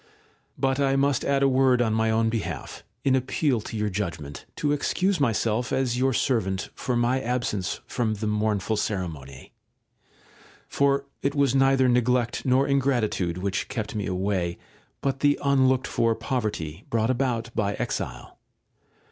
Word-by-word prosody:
§ - - -32
3. - - -30 0.5
But 135 0 +1
I 135 -1 +2
must 140 -1 +2
add 140 0 +1
a - - +5
word 130 -1 +3
on 115 -3 +2
my 110 0 +2
own 115 0 +2
behalf, 115 -2 -4 0.2
in 135 -1 +3
appeal 130 -1 0
to 110 - -6
your 105 -1 -1
judgement, 85 -7 -5
to 145 - 0
excuse 180 +5 +1
myself, 115 -2 0
as 130 -2 +1
your 135 +1 +3
servant, 110 -7 0
for 125 - -2
my 120 +2 +1
absence 120 -6 -2
from 110 -3 -1
the 105 +1 -4
mournful 105 0 0
ceremony; 80 - -4 1.1
for 140 0 +1 0.2
it 140 +1 -1
was 140 -3 +3
neither 135 -1 +4
neglect 125 0 +1
nor 130 +2 +3
ingratitude 120 -11 +1
which 95 +1 -2
kept 110 -4 -4
me 105 -2 -3
away, 90 -2 -1 0.4
but 135 -1 -1
the 145 0 +3
unlooked 130 -2 +3
for 115 -1 +1
poverty 105 - -3
brought 115 +1 +1
about 120 -3 -1
by 100 -2 0
exile. - - -5
120 Hz, 155 wpm, -25 LUFS, 105-135 Hz, 1.1 s, a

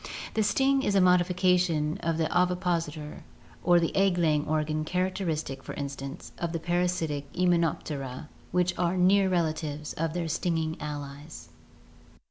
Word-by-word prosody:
The 220 - +1
sting 270 +6 +3
is 205 - 0
a - - +6
modification 180 -2 +3
of 165 -1 -1
the 165 - +1
ovipositor 175 -4 -1 0.4
or 175 0 +5
egg 195 -2 +3
laying 155 -3 +2
organ 155 0 0
characteristic, 165 -5 -2
for - - -7
instance, 140 +2 -6
of 170 -1 -2
the 165 - -1
parasitic 175 -4 -1
Hymenoptera 160 -6 0 0.2
which 180 0 +2
are 180 +1 +1
near 190 +2 +4
relatives 155 -4 -1
of 165 0 -2
their 170 -1 -2
stinging 160 -1 -1
allies. 145 - -7
170 Hz, 130 wpm, -28 LUFS, 150-180 Hz, 0.4 s, a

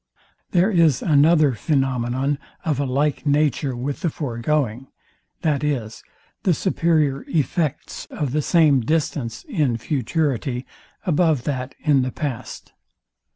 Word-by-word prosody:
There 185 +4 +3
is 165 - +3
another 155 -1 +5
phænomenon 135 0 0 0.3
of 150 -4 0
a 140 - +1
like 140 +3 0
nature 145 -2 +1
with 135 +4 -3
the 170 - +1
foregoing, 130 -2 -2 0.6
viz, 140 -7 -1 0.4
the 180 -4 +2
superior 155 -7 +1
effects 155 -1 -2
of 145 -4 -3
the 150 +2 +1
same 155 -3 +4
distance 145 -2 -2
in 155 - 0
futurity 130 -1 -1 0.4
above 160 -6 +2
that 130 -2 -3
in 145 -4 +3
the 130 0 -2
past. 130 -6 -6
145 Hz, 115 wpm, -22 LUFS, 130-155 Hz, 0.6 s, another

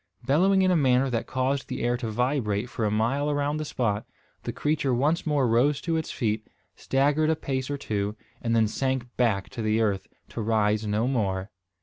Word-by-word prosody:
Bellowing 190 +7 +4
in 185 - +3
a - - +4
manner 130 -3 +3
that 115 -1 -2
caused 130 +1 -1
the - - -4
air 120 +1 +2
to 120 -2 -4
vibrate 120 -2 -1
for 110 - -2
a - - +2
mile 120 +8 +1
around 145 +1 0
the 155 - -2
spot, 105 -7 -1 0.4
the - - -4
creature 145 -4 0
once 150 +7 +1
more 145 -4 +2
rose 130 +5 +3
to 165 -2 -1
its 160 0 -2
feet, 110 -3 -2 0.3
staggered 145 +3 +1
a 160 - +3
pace 130 -3 -3
or 145 - -2
two, 105 -5 -2 0.3
and 115 -1 0
then 110 -1 +4
sank 130 +1 -2
back 110 -6 +1
to 115 - -6
the 110 0 +1
earth, 100 -4 0 0.2
to 115 - -5
rise 105 -1 +1
no 105 +3 +1
more. 100 -6 -1
125 Hz, 205 wpm, -26 LUFS, 110-145 Hz, 0.4 s, Bellowing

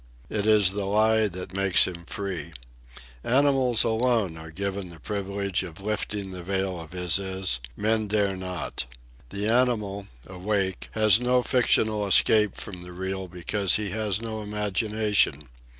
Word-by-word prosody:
It 105 -1 -1
is 105 -4 +5
the 100 0 -3
Lie 110 +2 +3
that 90 -1 -7
makes 95 -1 +4
him 85 -2 -7
free. 90 -6 -5 0.7
Animals 130 -2 +3
alone 115 -5 +1
are 80 0 -10
given 100 +2 -4
the 85 -1 -13
privilege 100 0 -2
of 85 -2 -9
lifting 100 -1 -3
the 90 -1 -7
veil 95 0 -2
of 80 +2 -10
Isis; 95 -4 +1 0.2
men 110 0 0
dare 100 -2 +1
not. 90 -8 -4 0.4
The 100 +1 -2
animal, 110 -5 +1 0.2
awake, 95 0 -2
has 110 -1 +5
no 125 0 +2
fictional 110 -5 +2
escape 105 +1 +4
from 90 -3 -7
the 90 0 -9
Real 95 +1 -4
because 90 +2 +1
he 105 -3 -1
has 105 -2 -1
no 110 -1 -5
imagination. 105 - 0
100 Hz, 145 wpm, -26 LUFS, 95-110 Hz, 0.7 s, is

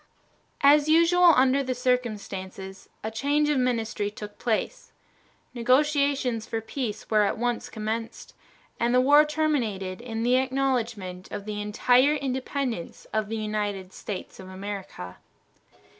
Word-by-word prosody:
As 290 +2 +5
usual 335 +2 +6
under 260 +2 +4
the 255 -2 -2
circumstances, 200 -6 -3
a 220 - -3
change 290 +6 +1
of 295 -3 +2
ministry 225 -4 -1
took 210 0 -10
place. 230 -3 -2 0.6
Negotiations 260 -2 +1
for 225 - -2
peace 225 -1 -5
were 215 -1 +5
at 205 - +1
once 245 +1 -2
commenced, 225 +1 -5 0.5
and 240 +1 +2
the - - +6
war 290 +4 +6
terminated 235 -12 -1
in 225 -2 -4
the 250 +2 +3
acknowledgment 240 -8 -2
of 200 - -6
the 210 -1 -4
entire 250 +7 +3
independence 260 - -3
of 215 -1 -1
the 225 - -2
United 205 -3 -3
States 200 -3 -7
of 185 -1 -10
America. 190 - -7
235 Hz, 130 wpm, -26 LUFS, 210-270 Hz, 0.6 s, usual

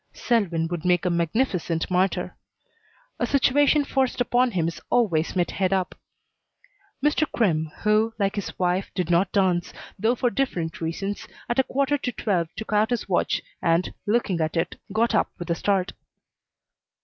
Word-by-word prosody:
Selwyn 175 -9 +1
would 170 -2 -4
make 180 -1 +2
a 180 - +2
magnificent 170 -1 0
martyr. 185 +1 0 0.8
A - - +1
situation 285 +2 +3
forced 265 -3 0
upon 245 +1 +3
him 175 -7 0
is 170 - -5
always 185 -11 +1
met 175 -2 +1
head 185 -1 0
up. 190 -2 0 1.1
Mr. 300 0 +2
Crimm, 160 -8 +1
who, 215 +1 +3
like 200 -2 +1
his 205 - -5
wife, 180 +1 0
did 180 -2 -1
not 175 +2 +3
dance, 185 -3 +1 0.3
though 225 +5 +2
for 245 0 0
different 175 -14 -2
reasons, 195 +5 -3 0.2
at 240 - 0
a - - +6
quarter 280 +2 0
to 250 - -2
twelve 180 -9 -1
took 220 -1 -5
out 210 +1 +3
his 245 -1 -2
watch - - 0 0.2
and, 170 +1 +1
looking 205 -6 +1
at 160 +1 -1
it, 165 - -1 0.2
got 225 +3 +1
up 215 - +2
with 175 0 -5
a - - +2
start. 195 0 0
195 Hz, 165 wpm, -24 LUFS, 175-240 Hz, 1.1 s, a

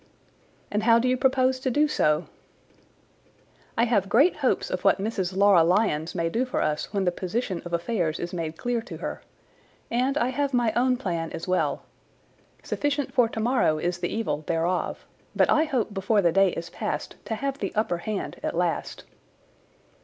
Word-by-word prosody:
"And 210 - 0
how 230 +1 +5
do 240 +2 +1
you 255 - +3
propose 260 0 +2
to 260 - -1
do 295 +5 +3
so?" 155 - +1 1.5
"I 230 - +4
have 205 -5 +1
great 280 - +4
hopes - - 0
of - - -3
what - - +4
Mrs. 190 -3 -2
Laura 200 -4 +6
Lyons 175 -3 +1
may 165 -2 0
do 225 +9 0
for 255 - -2
us 150 0 -1
when 200 -2 0
the 180 - +3
position 185 +1 -3
of 175 - -7
affairs 170 -2 -1
is 175 +1 -5
made 165 -2 -4
clear 245 -1 -1
to 225 - -9
her. - - -5 0.7
And 255 +4 +1
I 255 - +1
have 280 0 -1
my 235 -3 +2
own 250 +1 +2
plan 170 -8 -3
as 165 +2 -6
well. 185 0 0 0.8
Sufficient 290 -1 -2
for 245 -3 +4
tomorrow 225 -8 +1
is 175 +2 -2
the - - -2
evil 185 -9 -2
thereof; 170 +2 -1 0.3
but - - +3
I 310 - +4
hope 250 -8 -1
before 200 +1 +1
the 170 - +4
day 195 +2 +4
is 165 0 -6
past - - -4
to 220 - -2
have 275 +4 -3
the 195 - -2
upper 210 -5 0
hand 205 +3 -4
at - - -3
last." 175 -1 -2
210 Hz, 185 wpm, -26 LUFS, 175-250 Hz, 1.5 s, Laura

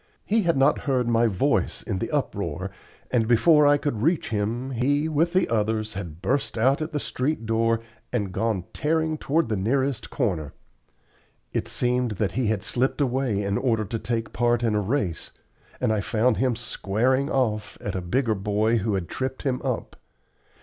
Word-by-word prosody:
He 220 +2 +2
had 170 -6 +1
not 135 - +4
heard 125 -3 +2
my 115 0 +3
voice 95 -5 0
in 95 - -3
the - - -3
uproar, - - -2 0.4
and 115 -3 +2
before 150 +6 +5
I 145 0 +5
could 145 -7 -2
reach 160 +5 +1
him, 115 +5 -2
he 140 +5 +1
with 160 +2 +1
the 185 +1 +2
others 110 -1 0
had 85 -3 -7
burst 135 -1 0
out 135 +6 +3
at 155 - -3
the 150 - -1
street 135 -2 -2
door 115 0 +1 0.3
and 105 -6 -1
gone 105 -1 -1
tearing 160 +1 0
toward 160 +1 +1
the 110 - -1
nearest 130 +6 0
corner. 90 - -1 1.0
It - - -1
seemed 125 -2 0
that 100 0 -1
he 125 -2 0
had 105 -2 0
slipped 130 +4 0
away 130 -6 0
in 100 0 0
order 115 -5 +1
to 115 +3 -3
take 115 0 -3
part 120 +3 +2
in 115 -2 +2
a 105 - +2
race, 100 - -2 0.5
and 120 -3 +1
I 105 - 0
found 110 +3 +1
him 125 -2 +1
"squaring 120 +4 0
off" 110 -5 -1
at 100 - -4
a 95 - -2
bigger 110 +7 +1
boy 105 +3 +1
who 105 -1 0
had 90 -3 -2
tripped 130 0 -4
him 130 -2 -1
up. - - -3
120 Hz, 185 wpm, -25 LUFS, 105-135 Hz, 1.0 s, before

